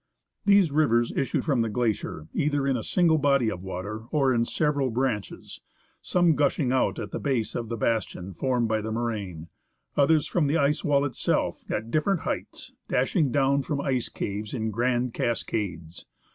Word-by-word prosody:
These 200 Hz, -5 st, +5 dB
rivers 120 Hz, -6 st, +2 dB
issue 135 Hz, -, 0 dB
from 140 Hz, -7 st, +1 dB
the 115 Hz, -, 0 dB
glacier 105 Hz, -9 st, -2 dB
either 145 Hz, -1 st, 0 dB
in 135 Hz, -1 st, +2 dB
a 120 Hz, -, -2 dB
single 165 Hz, -, +2 dB
body 140 Hz, -6 st, +3 dB
of 90 Hz, -, -6 dB
water, 100 Hz, +4 st, -6 dB
or 135 Hz, -4 st, +2 dB
in 115 Hz, -1 st, +2 dB
several 145 Hz, -1 st, 0 dB
branches, 120 Hz, -4 st, -3 dB, 0.4 s
some 175 Hz, -2 st, +3 dB
gushing 140 Hz, -2 st, +1 dB
out 130 Hz, -, +1 dB
at -, -, -5 dB
the -, -, -3 dB
base 130 Hz, -6 st, -1 dB
of 115 Hz, -2 st, -4 dB
the 115 Hz, -, -3 dB
bastion 105 Hz, -4 st, -2 dB
formed 125 Hz, +4 st, 0 dB
by 110 Hz, 0 st, 0 dB
the 110 Hz, +1 st, -4 dB
moraine, 105 Hz, -8 st, -3 dB, 0.5 s
others 145 Hz, +1 st, +4 dB
from 165 Hz, -5 st, +1 dB
the 150 Hz, +4 st, +2 dB
ice 145 Hz, 0 st, +1 dB
wall 140 Hz, -1 st, +2 dB
itself, 135 Hz, -, -1 dB
at 110 Hz, +2 st, -3 dB
different 160 Hz, +5 st, +1 dB
heights, -, -, -5 dB
dashing 155 Hz, -, +1 dB
down 140 Hz, +1 st, +2 dB
from 140 Hz, +2 st, -3 dB
ice 130 Hz, -3 st, -1 dB
caves 105 Hz, +3 st, -4 dB
in 110 Hz, -2 st, -2 dB
grand 120 Hz, +1 st, 0 dB
cascades. 90 Hz, -8 st, -3 dB
125 Hz, 175 wpm, -26 LUFS, 110-145 Hz, 0.5 s, These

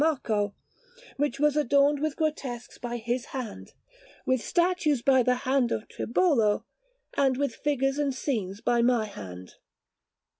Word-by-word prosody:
Marco, 215 Hz, -10 st, 0 dB, 0.6 s
which 275 Hz, -2 st, -1 dB
was 295 Hz, 0 st, +3 dB
adorned 285 Hz, 0 st, +3 dB
with 310 Hz, -1 st, -1 dB
grotesques 280 Hz, -7 st, -3 dB
by 240 Hz, -1 st, -4 dB
his 240 Hz, +2 st, -2 dB
hand, 240 Hz, -5 st, -6 dB, 0.5 s
with 260 Hz, -2 st, +1 dB
statues 345 Hz, -7 st, +1 dB
by 265 Hz, -2 st, +5 dB
the 250 Hz, +1 st, +2 dB
hand 260 Hz, -2 st, +2 dB
of 215 Hz, -, -2 dB
Tribolo, 235 Hz, -, +1 dB, 0.5 s
and 265 Hz, -2 st, +2 dB
with 280 Hz, -3 st, 0 dB
figures 270 Hz, 0 st, 0 dB
and 285 Hz, -2 st, +1 dB
scenes 220 Hz, -7 st, -3 dB
by 240 Hz, -1 st, +2 dB
my 240 Hz, -2 st, +3 dB
hand. 95 Hz, -, -9 dB
260 Hz, 140 wpm, -27 LUFS, 235-290 Hz, 0.6 s, by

